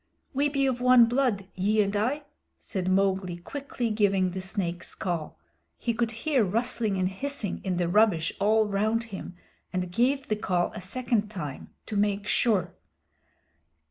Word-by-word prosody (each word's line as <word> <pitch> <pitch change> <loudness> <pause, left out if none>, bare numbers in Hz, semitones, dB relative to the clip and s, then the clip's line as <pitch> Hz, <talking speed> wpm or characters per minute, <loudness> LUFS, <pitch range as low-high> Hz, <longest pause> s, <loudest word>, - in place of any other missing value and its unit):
"We 285 +2 +2
be 275 -1 +1
of 250 -2 0
one 250 -1 +7
blood, 235 -5 +1
ye 205 +3 +1
and 200 +1 -2
I," 255 +9 0 0.3
said 185 -4 -4
Mowgli, 190 -2 +1
quickly 245 +3 -4
giving 195 -3 +2
the 190 +1 -4
Snake's 185 -2 -2
Call. 170 - -3 0.4
He 235 - -1
could 235 0 0 0.2
hear 285 -7 +3
rustling 220 0 0
and 185 0 +1
hissing 220 +2 -3
in 185 -2 -1
the 175 -1 +1
rubbish 180 -4 +3
all 215 +2 +4
round 215 +3 0
him 185 -1 -7 0.4
and 180 -1 -2
gave 265 +7 +1
the 215 - 0
Call 180 -4 0
a 215 - -7
second 220 +2 -1
time, 150 -10 -6 0.2
to 215 - -5
make 205 0 +1
sure. 195 -9 +2
205 Hz, 160 wpm, -27 LUFS, 185-240 Hz, 0.4 s, one